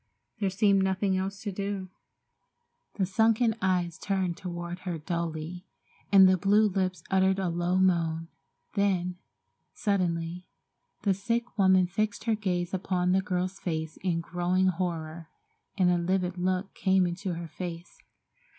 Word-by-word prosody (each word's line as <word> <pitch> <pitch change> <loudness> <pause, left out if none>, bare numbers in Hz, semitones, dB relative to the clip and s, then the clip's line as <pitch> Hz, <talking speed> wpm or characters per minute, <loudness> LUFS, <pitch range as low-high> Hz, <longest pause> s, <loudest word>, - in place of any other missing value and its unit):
There 200 -2 +1
seemed 195 0 +3
nothing 190 0 +1
else 195 +3 -3
to 205 - -2
do. 195 -1 -4 1.1
The 195 - +1
sunken 225 +4 +3
eyes 180 -3 0
turned 190 -3 -1
toward 175 0 -6
her 180 -2 -4
dully, 170 +2 -4 0.4
and 195 -1 +8
the 185 -1 +3
blue 205 +4 +4
lips 185 -1 -1
uttered 190 0 +3
a 190 -2 0
low 175 +2 0
moan, 165 -3 +2 0.5
then, 180 -3 0 0.6
suddenly, 180 -3 -1 0.6
the 200 - +3
sick 230 +5 -2
woman 190 -2 +5
fixed 205 +3 -2
her 225 - +1
gaze 185 -4 -1
upon 180 -1 0
the 190 +1 +3
girl's 185 -1 -2
face 160 -2 -3
in 175 -3 0
growing 180 +2 +1
horror, 165 -2 -3 0.5
and 180 -2 +4
a 175 - +2
livid 180 +1 0
look 185 +2 -1
came 190 -1 +2
into 175 +1 -3
her 170 0 -6
face. 170 +1 -7
185 Hz, 140 wpm, -28 LUFS, 175-195 Hz, 1.1 s, and